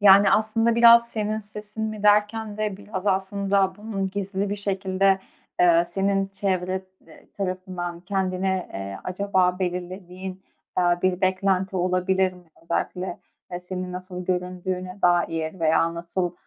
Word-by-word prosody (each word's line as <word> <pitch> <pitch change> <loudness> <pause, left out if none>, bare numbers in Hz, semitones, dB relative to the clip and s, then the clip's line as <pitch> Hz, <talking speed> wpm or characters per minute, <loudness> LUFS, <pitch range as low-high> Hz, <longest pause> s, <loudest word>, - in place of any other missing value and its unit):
Yani, 200 0 +8
aslında 225 +2 +2
biraz 235 0 +7
senin 215 -1 -2
sesin 210 +1 -8
mi 215 -1 -3
derken 210 +1 +3
de 215 -2 -2
biraz 200 -1 -6
aslında 195 0 +1
bunun 205 -3 -3
gizli 200 0 -2
bir 205 - -1
şekilde, 195 -1 +1 0.4
eee, 170 -1 +6
senin 195 +2 0
çevre, 190 -1 -1 0.2
eee, - - -17
tarafından 185 -2 -4
kendine, 190 0 -1
eee, 95 0 -5
acaba 185 -1 +1
belirlediğin, 185 +1 -5 0.4
eee, 175 -1 +3
bir 185 -1 +1
beklenti 190 0 +1
olabilir 185 +1 +1
mi? 180 -1 -16 0.2
Özellikle, 175 +2 -2 0.3
eee, 175 0 -4
senin 180 0 -5
nasıl 180 0 -6
göründüğüne 185 +1 -3
dair 170 -1 +1
veya 165 +1 +3
nasıl, 175 +1 -2
190 Hz, 130 wpm, -24 LUFS, 180-200 Hz, 0.4 s, Yani